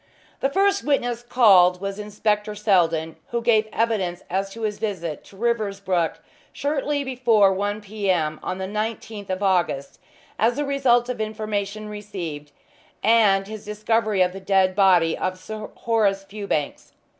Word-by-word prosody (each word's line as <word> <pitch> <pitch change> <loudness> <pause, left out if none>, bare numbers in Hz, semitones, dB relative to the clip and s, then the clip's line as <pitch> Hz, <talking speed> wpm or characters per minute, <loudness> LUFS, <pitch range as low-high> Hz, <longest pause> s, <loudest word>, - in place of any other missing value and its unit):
The 270 - +1
first 395 +5 +2
witness 245 -5 0
called 195 -8 +5
was 195 +1 -4
Inspector 210 0 -1
Seldon, 170 -6 +1
who 235 - -2
gave 225 -2 +3
evidence 200 -6 -1
as 195 +2 -1
to 225 +3 -8
his 210 -1 -2
visit 180 -8 -4
to 195 - -16
Riversbrook 200 -6 0 0.4
shortly 285 0 -1
before 235 -7 +3
1 205 +2 -2
p. 205 -1 -4
m. 155 -4 +1
on 185 - -4
the 190 - -3
19th 215 0 -4
of 185 +2 -2
August 175 -8 0 0.4
as 230 +3 +3
the 290 +1 -1
result 250 -4 +2
of 250 -3 -3
information 215 -1 -3
received, 180 -8 -7 0.5
and 205 -3 +4
his 215 +1 -8
discovery 215 -1 +1
of 180 0 -1
the 195 - -7
dead 190 -1 +2
body 180 -5 +4
of 185 0 -2
Sir 215 +3 -7
Horace 210 -4 +1
Fewbanks. 195 -7 -4
205 Hz, 150 wpm, -23 LUFS, 190-225 Hz, 0.5 s, called